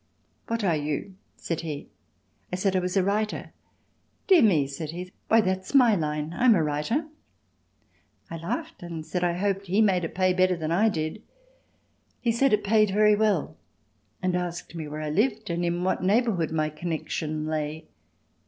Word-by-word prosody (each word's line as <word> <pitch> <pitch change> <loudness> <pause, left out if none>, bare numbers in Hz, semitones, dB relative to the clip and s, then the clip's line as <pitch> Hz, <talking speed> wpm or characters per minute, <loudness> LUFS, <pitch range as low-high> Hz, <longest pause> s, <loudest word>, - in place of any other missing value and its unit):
"What 230 -1 -2
are 175 -5 +2
you?" 150 +5 -3 0.2
said 165 -1 -3
he. 150 -4 -6 0.6
I - - -1
said 190 +1 0
I - - +4
was 180 +1 -2
a 190 - +4
writer. 210 +2 -1 0.7
"Dear 375 -5 +6
me," 170 -11 +4
said 140 +3 -6
he. 180 +3 -6 0.2
"Why 225 0 +5
that's 190 +5 -2
my 245 -5 +7
line—I'm 160 +7 +2
a 165 - +2
writer." 150 - -1 1.2
I 165 - -6
laughed 165 +1 -5
and 165 -2 -6
said 180 +1 -2
I 175 -1 +2
hoped 195 0 -1
he 190 +4 +1
made 190 -5 +3
it 165 - -5
pay 185 0 +3
better 185 0 +2
than 160 -1 -3
I 210 +6 +4
did. 160 +2 -3 1.0
He 235 - +1
said 250 +3 +2
it 210 - +2
paid 215 0 +3
very 210 +2 +4
well 215 -1 0 0.7
and 185 -1 +1
asked 175 -1 -4
me 160 -3 -5
where 150 +1 -6
I 155 -1 -3
lived 215 - 0
and 170 +1 -1
in 175 +1 -1
what 185 - 0
neighbourhood 195 -3 +2
my 155 -1 -1
connection 155 -1 -3
lay. 155 0 -3
180 Hz, 175 wpm, -26 LUFS, 160-210 Hz, 1.2 s, my